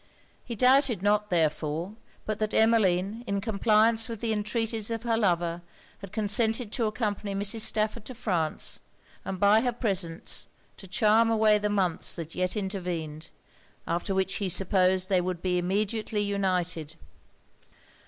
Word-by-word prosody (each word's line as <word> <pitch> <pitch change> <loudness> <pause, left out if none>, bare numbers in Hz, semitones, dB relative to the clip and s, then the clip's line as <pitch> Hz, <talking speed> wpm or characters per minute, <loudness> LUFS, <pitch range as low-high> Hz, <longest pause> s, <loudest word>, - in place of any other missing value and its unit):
He 235 - -6
doubted 250 -3 +3
not, 210 0 +2
therefore, 160 +2 -1 0.3
but 215 -1 -3
that 215 0 -2
Emmeline, 220 -1 +2
in 200 0 -1
compliance 220 +2 +2
with 230 -2 -6
the 225 -1 -1
entreaties 220 +1 -1
of 230 0 -4
her 235 -2 +1
lover, 175 -5 0 0.4
had 195 -3 -10
consented 220 +2 +1
to 230 -2 0
accompany 210 -2 -3
Mrs. 200 +3 0
Stafford 215 0 +2
to 255 - -8
France, 175 -9 -2 0.4
and 190 -1 -5
by 205 +3 +5
her 245 0 0
presence 190 -8 -1 0.3
to 195 - -11
charm 220 +3 +3
away 215 -1 +3
the 210 0 -1
months 190 -5 0
that 165 -2 -6
yet 185 +3 -2
intervened; 175 -6 -4 0.6
after 175 +3 -2
which 190 0 0
he 200 -2 -2
supposed 185 0 +2
they 185 -2 +2
would 180 -1 -4
be 180 -1 +1
immediately 210 +3 -1
united. 180 -6 -2
205 Hz, 145 wpm, -27 LUFS, 180-220 Hz, 0.6 s, by